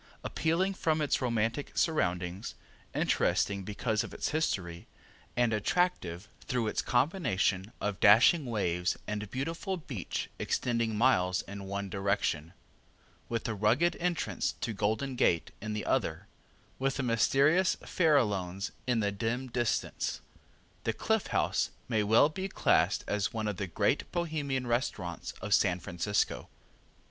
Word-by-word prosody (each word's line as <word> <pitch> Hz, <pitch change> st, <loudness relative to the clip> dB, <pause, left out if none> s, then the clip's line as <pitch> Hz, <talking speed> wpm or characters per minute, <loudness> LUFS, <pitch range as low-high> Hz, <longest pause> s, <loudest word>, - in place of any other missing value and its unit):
Appealing 175 Hz, +5 st, 0 dB
from 160 Hz, -4 st, 0 dB
its 150 Hz, -2 st, +1 dB
romantic 115 Hz, +2 st, -1 dB
surroundings, 90 Hz, -, 0 dB, 0.4 s
interesting 100 Hz, 0 st, +1 dB
because 105 Hz, +3 st, -1 dB
of -, -, -8 dB
its -, -, -1 dB
history, 90 Hz, -, -2 dB, 0.5 s
and 120 Hz, -2 st, +3 dB
attractive 105 Hz, -, 0 dB, 0.2 s
through 125 Hz, -4 st, 0 dB
its 105 Hz, -, 0 dB
combination 115 Hz, -, +1 dB
of 105 Hz, -2 st, -2 dB
dashing 120 Hz, +8 st, +6 dB
waves 90 Hz, -6 st, 0 dB
and 105 Hz, -1 st, -4 dB
beautiful 165 Hz, -, -3 dB
beach 130 Hz, -, -4 dB
extending 115 Hz, -3 st, 0 dB
miles 90 Hz, -7 st, +3 dB
in 100 Hz, 0 st, -8 dB
one 100 Hz, +1 st, -3 dB
direction, 95 Hz, -4 st, -1 dB, 0.8 s
with 115 Hz, -1 st, -1 dB
the 115 Hz, -, -2 dB
rugged 110 Hz, -, +2 dB
entrance 175 Hz, -1 st, -1 dB
to 115 Hz, -, -2 dB
Golden 110 Hz, +7 st, -1 dB
Gate 85 Hz, -8 st, +2 dB
in 110 Hz, +1 st, -4 dB
the 105 Hz, -, -3 dB
other, -, -, 0 dB, 0.5 s
with 135 Hz, 0 st, 0 dB
the 140 Hz, -, -1 dB
mysterious 140 Hz, +9 st, +3 dB
Farallones 105 Hz, -, +1 dB, 0.2 s
in 120 Hz, -3 st, +2 dB
the 100 Hz, -1 st, +1 dB
dim 120 Hz, +5 st, -2 dB
distance, 120 Hz, -1 st, -1 dB, 0.6 s
the -, -, 0 dB
Cliff -, -, 0 dB
House -, -, +1 dB, 0.2 s
may 110 Hz, -3 st, +1 dB
well 110 Hz, +7 st, +5 dB
be 190 Hz, +5 st, -4 dB
classed -, -, +2 dB
as 105 Hz, -1 st, -1 dB
one 110 Hz, -1 st, -2 dB
of 105 Hz, -3 st, -2 dB
the 100 Hz, -, -3 dB
great 100 Hz, -, 0 dB
Bohemian 150 Hz, -7 st, -1 dB
restaurants 115 Hz, -, -2 dB
of 105 Hz, -, 0 dB
San 90 Hz, -3 st, +3 dB
Francisco. 90 Hz, +4 st, -1 dB
110 Hz, 135 wpm, -30 LUFS, 100-140 Hz, 0.8 s, dashing